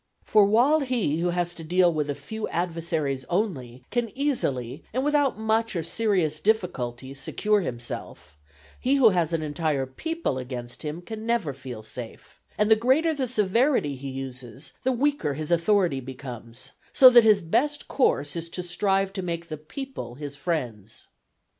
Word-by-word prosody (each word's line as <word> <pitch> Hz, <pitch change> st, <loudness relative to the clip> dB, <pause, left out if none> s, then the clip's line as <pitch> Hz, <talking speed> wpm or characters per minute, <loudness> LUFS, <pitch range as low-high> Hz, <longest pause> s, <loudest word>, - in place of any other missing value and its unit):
For 210 Hz, -2 st, +5 dB
while 245 Hz, +10 st, +4 dB
he 240 Hz, -, 0 dB
who 175 Hz, +1 st, +1 dB
has 175 Hz, 0 st, -1 dB
to 165 Hz, -, -9 dB
deal 175 Hz, +1 st, +3 dB
with 150 Hz, -2 st, -1 dB
a 145 Hz, -, -1 dB
few 215 Hz, +11 st, -5 dB
adversaries 165 Hz, -5 st, -2 dB
only, 135 Hz, -, -2 dB
can 240 Hz, -1 st, 0 dB
easily 140 Hz, -, -1 dB
and 260 Hz, +3 st, 0 dB
without 290 Hz, -4 st, +2 dB
much 220 Hz, 0 st, 0 dB
or 170 Hz, -, -1 dB
serious 175 Hz, -5 st, +1 dB
difficulty 135 Hz, -, -1 dB
secure 210 Hz, +9 st, 0 dB
himself, 120 Hz, -, -6 dB, 0.4 s
he 265 Hz, +3 st, +2 dB
who 260 Hz, -5 st, +7 dB
has 175 Hz, -4 st, +1 dB
an 165 Hz, -2 st, -1 dB
entire 150 Hz, -2 st, -1 dB
people 320 Hz, -, -3 dB
against 125 Hz, -1 st, -7 dB
him 155 Hz, +3 st, -5 dB
can 220 Hz, +4 st, -7 dB
never 235 Hz, -12 st, 0 dB
feel 130 Hz, -4 st, -8 dB
safe 110 Hz, +1 st, -10 dB, 0.2 s
and 210 Hz, +1 st, +2 dB
the -, -, +9 dB
greater 265 Hz, +9 st, +3 dB
the 270 Hz, -4 st, -1 dB
severity 225 Hz, -, +2 dB
he 135 Hz, +1 st, -7 dB
uses 130 Hz, 0 st, -7 dB
the 260 Hz, -, +1 dB
weaker 255 Hz, -, 0 dB
his 155 Hz, +2 st, -4 dB
authority 170 Hz, -3 st, +3 dB
becomes; 125 Hz, -2 st, -8 dB, 0.2 s
so 255 Hz, -1 st, +9 dB
that 240 Hz, -1 st, +8 dB
his 215 Hz, -2 st, +6 dB
best 290 Hz, -, 0 dB
course 145 Hz, -, +1 dB
is 170 Hz, 0 st, -4 dB
to 180 Hz, +2 st, -2 dB
strive 195 Hz, +2 st, +1 dB
to 195 Hz, -, -3 dB
make 170 Hz, -1 st, -4 dB
the 155 Hz, -, -3 dB
people 210 Hz, -, -7 dB
his 145 Hz, 0 st, -7 dB
friends. 125 Hz, -, -4 dB
170 Hz, 165 wpm, -26 LUFS, 135-220 Hz, 0.4 s, the